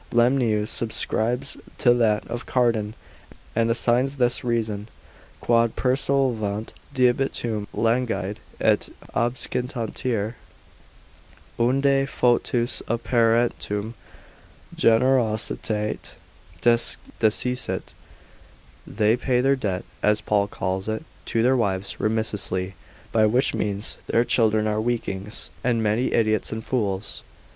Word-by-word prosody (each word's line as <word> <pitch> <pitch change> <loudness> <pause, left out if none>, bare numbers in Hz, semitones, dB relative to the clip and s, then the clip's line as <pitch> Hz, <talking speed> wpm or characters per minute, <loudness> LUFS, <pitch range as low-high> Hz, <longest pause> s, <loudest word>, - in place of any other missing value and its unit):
Lemnius 120 -3 +2
subscribes 120 +3 -1 0.2
to 120 -3 +5
that 110 -3 +2
of 120 +1 -5
Cardan, 115 -4 +1 0.6
and 115 0 +2
assigns 125 +4 +1
this 120 -1 +2
reason, 110 -3 -1 0.5
Quod 115 -1 +2
persolvant 125 -5 0 0.2
debitum 120 -5 +1
languide, 115 -4 0 0.2
et - - +2 0.2
obscitanter, 120 -2 -2 1.3
unde 135 +3 +3
foetus 120 -1 +1
a 120 - +1
parentum 115 -2 +1 0.8
generositate 115 -3 +1 0.5
desciscit: 120 +1 0 0.9
they 110 +1 +2
pay 125 0 +1
their 135 +2 +3
debt 100 -8 -3 0.2
(as 105 0 +3
Paul 100 -1 +1
calls 95 0 -3
it) 110 +8 -3 0.2
to 115 - +1
their 130 +2 +4
wives 100 -5 -1
remissly, 105 -4 -1 0.4
by 110 -1 +4
which 125 +5 +2
means 105 0 -2
their 115 +1 +2
children 110 -3 +2
are 105 0 0
weaklings, 110 -3 -3
and 115 -2 +1
many 110 +4 +1
times - - +1
idiots 110 -2 +1
and 110 0 -5
fools. 100 -5 -2
115 Hz, 100 wpm, -24 LUFS, 105-125 Hz, 1.3 s, to